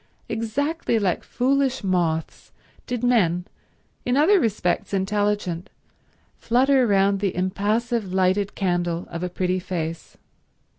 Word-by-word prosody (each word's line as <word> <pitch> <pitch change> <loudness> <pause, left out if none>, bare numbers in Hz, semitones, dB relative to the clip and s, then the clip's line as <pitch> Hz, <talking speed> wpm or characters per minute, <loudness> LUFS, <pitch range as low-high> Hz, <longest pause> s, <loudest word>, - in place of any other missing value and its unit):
Exactly 235 +5 -1
like 195 -5 0
foolish 265 0 0
moths 170 -4 -1 0.4
did 245 -1 -3
men, 180 -8 +2 0.6
in 250 +2 +1
other 370 +7 +5
respects 200 - 0
intelligent, 205 -2 -1 0.7
flutter 255 +2 +3
round 200 -1 +3
the 195 -2 -1
impassive 205 +3 -1
lighted 190 +2 +1
candle 175 -2 -1
of 170 - -5
a 180 - -2
pretty 185 +1 -1
face. 165 -3 -5
200 Hz, 110 wpm, -23 LUFS, 180-240 Hz, 0.7 s, other